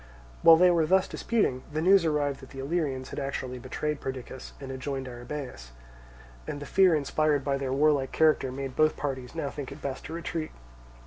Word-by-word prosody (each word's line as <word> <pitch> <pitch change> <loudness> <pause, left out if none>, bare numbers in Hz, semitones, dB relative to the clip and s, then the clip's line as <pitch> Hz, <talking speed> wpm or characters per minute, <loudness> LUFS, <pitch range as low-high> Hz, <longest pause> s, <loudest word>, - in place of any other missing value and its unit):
While 165 - +9
they 180 +2 +6
were 165 -2 +2
thus 190 +2 +4
disputing, 210 - 0
the 155 - -2
news 185 +2 +5
arrived 145 -3 0
that 135 - -13
the 135 - -12
Illyrians 135 -2 -2
had - - -4
actually 130 -2 -4
betrayed 150 +4 -3
Perdiccas 130 -1 -6
and 135 -1 -7
had 130 - -6
joined 135 -1 -4
Arrhabaeus; 120 - -7 0.7
and 145 - -4
the 145 - -7
fear 185 +1 +4
inspired 150 -1 +1
by 140 0 0
their 135 -1 -2
warlike 140 -1 +2
character 155 -4 +3
made 135 0 -5
both 155 0 +3
parties 130 -2 -4
now 145 -4 -2
think 140 -3 -6
it 140 - -9
best 135 -3 -5
to 160 - -7
retreat. 165 -1 -4
140 Hz, 195 wpm, -28 LUFS, 130-155 Hz, 0.7 s, While